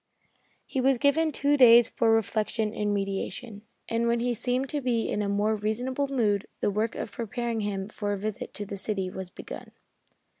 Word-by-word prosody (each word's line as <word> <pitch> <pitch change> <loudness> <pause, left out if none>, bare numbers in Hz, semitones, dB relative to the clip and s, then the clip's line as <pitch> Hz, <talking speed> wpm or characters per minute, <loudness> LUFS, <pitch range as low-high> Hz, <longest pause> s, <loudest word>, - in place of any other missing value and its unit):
He 265 - -2
was 265 0 +3
given 310 +5 +3
two 285 +1 +2
days 240 -3 +8
for 230 - +1
reflection 220 0 +1
and 210 -1 -1
meditation, 200 +2 -3 0.3
and 230 +1 0
when 235 0 +2
he 245 +1 0
seemed 250 +3 -1
to 295 - -2
be 240 -3 0
in 210 - -1
a 200 - -1
more 205 +2 +1
reasonable 245 +6 -1
mood, 215 -7 +1
the - - +1
work 215 +3 -1
of - - -5
preparing 235 0 -3
him 200 -2 -2
for 205 -1 -3
a 205 - -1
visit 215 +1 -4
to 205 - -4
the 200 0 -6
city 195 -2 -2
was 190 -1 -6
begun. - - -9
225 Hz, 190 wpm, -27 LUFS, 205-245 Hz, 0.3 s, days